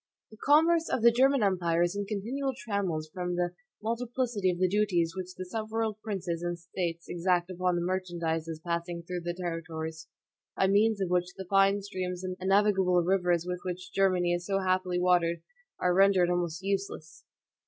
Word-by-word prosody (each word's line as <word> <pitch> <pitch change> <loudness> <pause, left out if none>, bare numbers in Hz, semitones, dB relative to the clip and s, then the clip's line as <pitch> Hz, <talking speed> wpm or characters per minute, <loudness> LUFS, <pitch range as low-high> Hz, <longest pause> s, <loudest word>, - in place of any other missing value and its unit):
"The 215 - -13
commerce 325 +6 +4
of 230 - -1
the 235 - +8
German 265 +2 +3
empire(2) 175 -4 +2
is 175 +3 -3
in 200 0 -3
continual 245 +7 -2
trammels 190 -10 -2
from 180 -1 -2
the 175 0 0 0.3
multiplicity 235 -3 -1
of 175 - -1
the 185 +1 +3
duties 180 -4 +1
which 185 -1 -6
the 185 - -6
several 220 +2 -2
princes 185 -6 -3
and 175 0 -2
states 170 0 -4
exact 175 0 0
upon 180 0 0
the 175 - -1
merchandises 170 -3 -2
passing 170 0 -3
through 180 +1 -4
their 175 0 -3
territories, 165 -2 -5 0.5
by - - +3
means 205 +2 +3
of 185 -2 -1
which 180 0 0
the 190 - -6
fine 195 +1 +3
streams 185 -2 -4
and 185 0 -3
navigable 190 -2 +3
rivers 175 -2 +1
with 180 0 -3
which 180 0 -6
Germany 185 -3 +2
is 175 0 -3
so 195 -1 +1
happily 185 -1 0
watered 175 -2 +2 0.4
are 180 0 +2
rendered 190 -2 +4
almost 175 -1 -2
useless." 195 -5 -4
185 Hz, 175 wpm, -29 LUFS, 175-200 Hz, 0.5 s, the